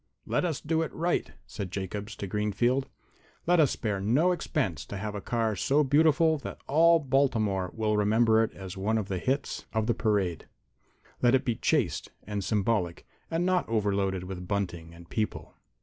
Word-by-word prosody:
"Let - - 0
us 160 -6 -2
do 160 +1 0
it 160 - -2
right," 170 +2 0
said 100 -4 -6
Jacobs 100 +3 -5
to - - -5
Greenfield. 105 +6 0 0.6
"Let 175 0 +4
us 150 -4 +5
spare 105 -3 -2
no 135 - +3
expense 135 - -1
to 100 - -6
have 105 +1 -4
a 105 - -5
car 115 -1 0
so 140 +10 +2
beautiful 155 +3 +4
that - - -7
all 165 +4 +5
Baltimore 120 - +1
will 110 -1 +1
remember 110 +2 +4
it 115 - -2
as 95 -2 -8
one 105 +4 0
of 105 -3 -3
the 95 -2 -1
hits 135 +7 -2
of 110 -1 +1
the 120 - +2
parade. 100 -8 0 0.7
Let 120 +1 +5
it 130 +1 0
be 120 - +1
chaste - - 0
and 105 -1 -4
symbolic, 100 -4 0 0.2
and 165 +2 0
not 185 -6 +1
overloaded 100 -4 0
with 90 -1 -7
bunting 85 -5 -3
and 85 0 -14
people." 110 +3 -3
110 Hz, 180 wpm, -28 LUFS, 100-140 Hz, 0.7 s, us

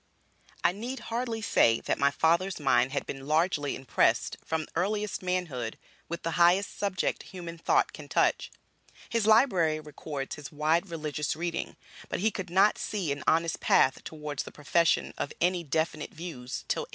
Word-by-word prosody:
I - - +5
need 240 +8 -5
hardly 230 -2 -2
say 115 - +4
that - - -1
my 140 - +4
father's 170 +6 +1
mind 135 -2 +3
had 140 -1 -2
been 135 0 -7
largely 155 -2 +1
impressed, 130 -3 +1
from 160 -1 -2
earliest 205 +4 -1
manhood, 175 -11 -2 0.3
with 170 0 -5
the 165 - -1
highest 180 +4 +4
subject 195 -3 -1
human 170 -3 -8
thought - - +2
can - - -9
touch. - - +2 0.6
His 230 -2 0
library 190 - +4
records 150 -2 -6
his 145 -3 -8
wide 160 +5 +1
religious 150 -2 -2
reading; 170 +1 -3 0.3
but - - -2
he 220 +4 +2
could 190 -4 -5
not 190 +4 +4
see 190 -8 -2
an 140 0 -3
honest 165 0 +2
path 130 - +3
towards 150 -3 -5
the - - -8
profession 165 +3 +1
of 145 - -3
any 175 0 +1
definite 155 +1 -1
views 155 -7 -6
till - - 0
1836. - - -8
165 Hz, 165 wpm, -29 LUFS, 150-185 Hz, 0.6 s, I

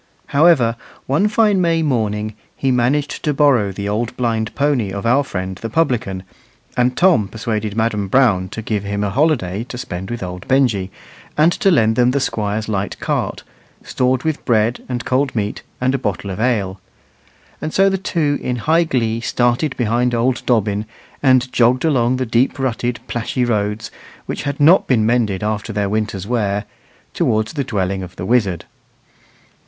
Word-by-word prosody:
However, 140 -7 +4 0.3
one 150 +10 +2
fine 210 -2 +3
May 165 -2 +2
morning 110 -6 -1 0.2
he 135 - 0
managed 135 +4 0
to 150 -2 -1
borrow 130 -9 +3
the 100 +1 -5
old 110 +3 -2
blind 115 -3 -1
pony 140 -7 +1
of 100 +3 -5
our 130 +5 +3
friend 95 -6 -4
the 115 - -5
publican, 115 - 0 0.5
and 125 0 +1
Tom 175 - +4
persuaded 110 -1 -3
Madam 110 -3 0
Brown 95 -6 +3
to 115 - -6
give 105 -2 -2
him 100 0 -2
a 100 - -1
holiday 115 - +1
to 125 -1 -8
spend 95 -5 -6
with 120 -3 -4
old 90 0 -7
Benjy, 120 -8 +2 0.5
and 155 +3 +5
to 195 - +2
lend 110 -10 +3
them 125 0 +4
the 140 +3 +1
Squire's 110 -4 -2
light 100 -2 -3
cart, - - -2 0.4
stored 125 0 0
with 160 -2 -2
bread 115 +1 +1
and 120 -1 -3
cold 130 +1 0
meat 105 -2 -2 0.2
and 130 +1 +1
a 135 - 0
bottle 100 -3 -3
of 95 - -6
ale. 100 -6 0 0.8
And 155 - -3
so 195 +3 +4
the 195 -1 +1
two 155 -7 0
in 125 - -2
high 160 +8 +2
glee 115 -6 -1
started 120 +5 0
behind 120 +1 +1
old 125 +2 0
Dobbin, 105 -3 +1 0.3
and 130 -1 +3
jogged 125 +4 +3
along 130 -5 +2
the 130 0 -1
deep 120 +5 +1
rutted 125 -2 -2
plashy 120 +1 -1
roads, 105 -1 -1 0.3
which - - -5
had 140 - -5
not 165 +6 +5
been 115 -5 +3
mended 110 -4 +1
after 110 +1 -2
their 100 -1 -1
winter's 105 -3 -2
wear, 105 -3 -1 0.5
towards 110 +1 0
the 145 -3 -1
dwelling 100 -6 -2
of 90 -1 -9
the 90 - -5
wizard. 100 -7 +1
120 Hz, 175 wpm, -19 LUFS, 105-135 Hz, 0.8 s, and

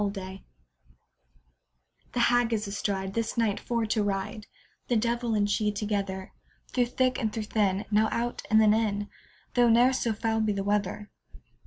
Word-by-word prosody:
THE 200 -1 0
HAG 190 0 -8 1.7
The 245 - -1
Hag 240 -1 +3
is 215 -1 -1
astride, 195 -1 -2
This 230 +2 -2
night 220 -3 +1
for 235 -2 -1
to 215 0 0
ride, 205 +1 -3 0.4
The 245 - +1
devil 235 0 0
and 205 -1 +2
she 210 +1 +1
together; 200 -2 -3 0.4
Through 245 -2 +1
thick 255 +1 0
and 220 -4 -1
through 220 0 -3
thin, 205 -2 0
Now 215 +1 +3
out, 240 +1 -2
and 220 - +5
then 215 -1 +5
in, 205 -2 0 0.4
Though 240 -1 +4
ne'er 240 +3 +5
so 235 -3 0
foul 225 +1 -1
be 215 -1 +1
the 195 0 -2
weather. 205 0 -1
215 Hz, 170 wpm, -28 LUFS, 205-230 Hz, 1.7 s, and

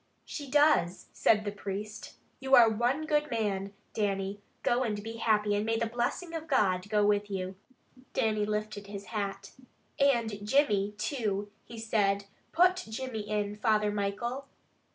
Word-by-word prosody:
"She 285 -3 -6
does," 290 - +3
said 210 -1 +3
the 205 - -1
priest. 205 +1 -6 0.2
"You 265 0 +4
are 235 - +8
one 240 +7 +1
good 300 -1 +1
man, 200 -4 -1 0.2
Dannie, 200 -1 -1 0.2
go 240 +1 +2
and 210 -5 -2
be 225 +1 -6
happy, 210 -2 +2
and 205 0 +1
may 225 +1 0
the 230 - 0
blessing 245 +9 -2
of 325 -1 -5
God 195 -8 +2
go 210 -1 +3
with 205 0 +2
you." 190 -1 -3 0.6
Dannie 215 -2 +1
lifted 210 -1 -3
his 200 0 -7
hat. 200 -2 -3 0.5
"And 230 -7 +2
Jimmy, 210 -4 +2
too," 210 -3 -2
he 230 - -10
said, 200 -3 +1 0.3
"put 360 +2 +4
Jimmy 220 -2 -5
in, 210 -1 -1
Father 210 -1 +2
Michael." 215 +7 -2
215 Hz, 155 wpm, -30 LUFS, 205-240 Hz, 0.6 s, are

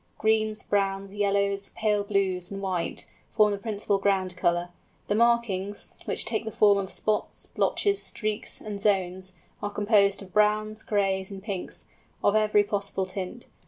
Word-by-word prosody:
Greens, 220 0 +1
browns, 195 -1 -1
yellows, 200 -1 +1
pale 210 -2 +1
blues, 190 -3 0
and 195 - -5
white, 185 -3 -2 0.2
form 210 -1 +4
the 200 - -2
principal 205 -2 -1
ground 190 -2 +1
colour; 175 0 +1 0.4
the - - +1
markings, 210 -4 +1 0.2
which - - -1
take 220 0 -1
the 220 - -4
form 205 -2 +4
of 190 -1 -4
spots, 215 -1 -2
blotches, 405 -1 0
streaks, 215 -1 -3
and 205 -2 -6
zones, 190 -2 0 0.3
are 205 - -2
composed 205 -1 +3
of 185 - -15
browns, 215 +1 +2
grays, 195 -3 0
and 195 -1 -8
pinks, 200 -4 -5 0.4
of 205 - +4
every 210 -1 +4
possible 200 -2 -2
tint. 185 +5 -6
200 Hz, 155 wpm, -27 LUFS, 195-215 Hz, 0.4 s, form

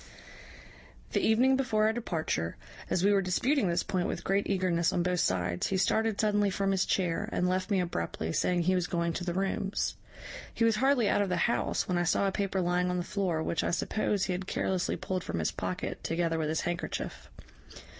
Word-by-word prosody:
"The - - +1
evening 250 +4 +4
before 250 -5 +1
our 220 - +3
departure, 160 - -2 0.3
as 180 - +1
we 205 - +5
were 200 - +3
disputing 240 +7 +1
this 170 0 +1
point 180 -2 -1
with - - -4
great 195 +1 +1
eagerness 180 -3 +1
on 175 - 0
both 180 0 0
sides, 90 - 0
he 195 - 0
started 220 +2 +1
suddenly 210 -2 +2
from 195 +1 0
his 190 -1 +1
chair, 175 -3 0
and 180 - +1
left 185 +2 0
me 200 -2 +2
abruptly, 85 - -2
saying 180 -1 +1
he 185 +3 +2
was 180 -1 0
going 170 -1 -1
to 175 - -4
the 175 -1 -2
rooms. 195 +1 -1 0.6
He 230 - +2
was 225 -1 +3
hardly 265 -3 +3
out 205 - +2
of 200 - 0
the 180 - 0
house 235 - 0
when 180 -1 +1
I - - +2
saw 175 +3 +2
a - - +1
paper 195 -1 -1
lying 180 0 +1
on 180 - -1
the 175 - -1
floor, 175 -5 -1
which, 170 - -1
I - - 0
suppose, 205 +3 0
he 185 - 0
had 185 +1 -4
carelessly 185 -2 -1
pulled 185 -1 -3
from - - -4
his 80 - 0
pocket, 90 -1 -4
together 165 -1 0
with 155 -1 -1
his 160 - 0
handkerchief. 175 0 -4
185 Hz, 215 wpm, -30 LUFS, 170-200 Hz, 0.6 s, we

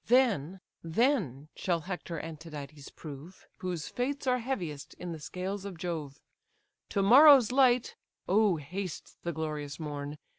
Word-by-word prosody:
Then, 200 - +3 0.2
then 165 - +1
shall 175 -3 0
Hector 175 -1 -5
and 160 -1 -6
Tydides 150 -3 -9
prove 155 +4 -10
Whose 180 -4 -4
fates 275 +3 -2
are 250 -1 +2
heaviest 170 - -4
in 175 -1 -6
the 160 - -6
scales 185 +5 -4
of 200 -4 -7
Jove. 160 -5 -4 0.7
To 200 - +1
morrow's 260 +2 +8
light 250 -2 +4 0.3
(O 205 -1 +4
haste 175 +4 -6
the 170 - -2
glorious 150 -2 -4
morn!) 145 -1 -5
175 Hz, 140 wpm, -30 LUFS, 150-220 Hz, 0.7 s, morrow's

